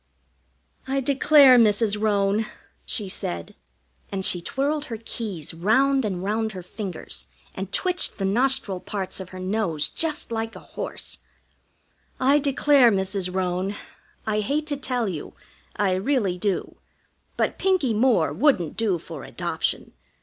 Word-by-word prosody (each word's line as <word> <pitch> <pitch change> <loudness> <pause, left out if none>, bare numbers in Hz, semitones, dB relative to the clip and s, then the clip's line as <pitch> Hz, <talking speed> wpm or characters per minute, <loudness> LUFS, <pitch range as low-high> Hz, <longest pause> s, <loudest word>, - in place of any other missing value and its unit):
"I 270 +1 0
declare, 275 -1 +6
Mrs. 210 -1 +3
Roane," 205 0 +1 0.4
she 210 -5 0
said 85 - -4 0.6
and 190 -1 -2
she 175 - +4
twirled 285 - -1
her 225 - -5
keys 210 -8 -4
round 260 +10 +2
and 185 -3 -3
round 215 +2 -1
her 185 -2 -7
fingers, 180 - -7 0.3
and 190 +1 -6
twitched 360 - +1
the 195 - -2
nostril 225 -2 +1
parts 195 0 -5
of 190 -1 -7
her 185 - -10
nose 185 -5 -1
just 310 -6 -1
like 225 0 -3
a - - -8
horse - - -6 1.0
"I 275 +3 +4
declare, 280 -3 +4
Mrs. 190 -1 -1
Roane, 185 +1 -1 0.5
I 215 -1 0
hate 285 +8 -1
to 290 - 0
tell 250 -4 -1
you, 165 -6 -6 0.4
I 200 -2 +1
really 200 -1 +1
do. 200 0 -2 0.6
But - - 0
Pinkie 370 -11 +2
Moore 215 - +3
wouldn't 180 - +2
do 215 -6 +1
for - - -9
adoption. - - -3
215 Hz, 140 wpm, -24 LUFS, 190-265 Hz, 1.0 s, declare